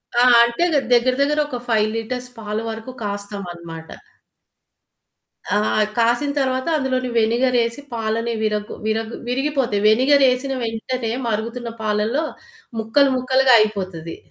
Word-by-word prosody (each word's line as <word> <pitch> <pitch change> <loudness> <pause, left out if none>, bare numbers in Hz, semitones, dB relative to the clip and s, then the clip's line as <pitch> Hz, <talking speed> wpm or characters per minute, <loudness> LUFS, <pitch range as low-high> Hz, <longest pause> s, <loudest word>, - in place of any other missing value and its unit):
ఆ! 240 - +4 0.2
అంటే 235 +8 0 0.3
దగ్గర 245 +1 +4
దగ్గర 295 +2 +2
ఒక 250 -4 -4
5 215 -2 +2
లిటర్స్ 250 +2 -4
పాల 210 0 -4
వరకు 225 +3 -6
కాస్తామన్నమాట. 180 -6 -6 1.7
ఆ! - - +4 0.4
కాసిన 240 +5 +2
తర్వాత 260 +1 -1
అందులోని 255 -2 -1
వెనిగర్ 235 +3 +2
ఏసి 230 +4 -4
పాలని 230 +1 -1
విర 215 -1 +1 0.3
విర 220 0 +1 0.3
విరిగిపోతాయి. 260 -4 0
వెనిగర్ 270 +6 +4
ఏసిన 265 +2 -2
వెంటనే 225 +1 -3 0.2
మరుగుతున్న 230 +2 -3
పాలల్లో 215 +7 0 0.6
ముక్కలు 270 +6 +3
ముక్కలుగా 260 0 +3
అయిపోతది. 185 -6 -2
235 Hz, 115 wpm, -21 LUFS, 215-255 Hz, 1.7 s, ఆ